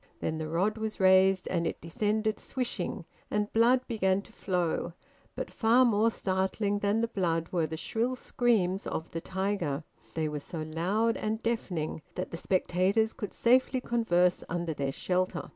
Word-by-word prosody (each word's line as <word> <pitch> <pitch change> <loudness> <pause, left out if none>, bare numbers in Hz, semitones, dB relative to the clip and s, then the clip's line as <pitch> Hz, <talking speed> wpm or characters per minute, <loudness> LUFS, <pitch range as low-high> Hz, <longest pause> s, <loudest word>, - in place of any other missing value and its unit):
Then 160 0 -2
the 155 - -3
rod 195 +7 0
was 220 -1 -4
raised 190 0 +5
and 170 -2 0
it - - -4
descended 215 +5 -1
swishing, 240 -7 -3 0.2
and 210 0 -1
blood 240 +3 +5
began 195 -4 +1
to - - -17
flow; 175 -3 -1 0.4
but - - -4
far 240 +3 +4
more 225 -1 +3
startling 200 0 -1
than 205 +2 +1
the 230 - +1
blood 170 -6 -1
were 170 -3 +1
the 160 +1 -5
shrill 230 +9 -1
screams 210 -7 +1
of 160 - -4
the 165 - -4
tiger; 190 -6 -2 0.3
they 160 -1 0
were 150 -1 -3
so 155 +2 -6
loud 185 +9 0
and 220 +1 -2
deafening 180 -10 -2
that - - -4
the 170 - -4
spectators 190 +5 +1
could 210 - -5
safely 255 +2 +3
converse 180 -8 +2
under 170 -1 -2
their 140 -2 -2
shelter. 180 +3 -1
190 Hz, 165 wpm, -29 LUFS, 170-220 Hz, 0.4 s, raised